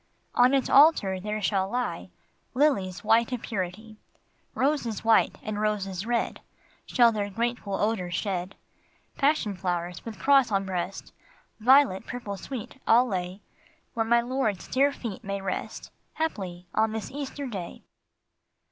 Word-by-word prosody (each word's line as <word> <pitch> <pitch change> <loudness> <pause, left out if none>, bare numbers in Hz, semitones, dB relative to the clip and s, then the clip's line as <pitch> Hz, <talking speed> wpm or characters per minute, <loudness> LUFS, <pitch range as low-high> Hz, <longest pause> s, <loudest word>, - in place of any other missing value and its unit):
" - - -43
On 255 +2 +5
its 270 - +1
altar 270 - +5
there 210 +2 -4
shall 190 0 +1
lie 245 +2 -3 0.5
Lilies 225 -11 +1
white 230 +3 +3
of 250 -2 -3
purity; 210 +2 -5 0.6
Roses 260 -6 0
white 225 0 +4
and 215 -3 -3
roses 200 -2 -2
red 240 -1 -1 0.5
Shall 240 -3 +5
their 205 -2 -2
grateful 230 -1 -2
odors 190 -4 -1
shed; 190 -2 -3 0.6
Passion 275 -8 +1
flowers 175 -1 -3
with 225 -3 -7
cross 275 -4 +4
on 195 -1 +1
breast, 185 0 -4 0.5
Violet 245 -4 +4
purple 240 -5 -5
sweet, 260 +4 -8
I - - +6
'11 245 +2 +5
lay 185 +1 -3 0.5
Where 230 - 0
my 235 +1 +3
Lord's 240 -5 -2
dear 275 +2 +3
feet 235 -4 -7
may 200 -1 -3
rest, 195 -1 -5 0.2
Haply 190 - -3
on 220 0 +1
this 220 -1 -5
Easter 285 0 -5
day." 195 -9 -6
215 Hz, 145 wpm, -27 LUFS, 190-250 Hz, 0.6 s, I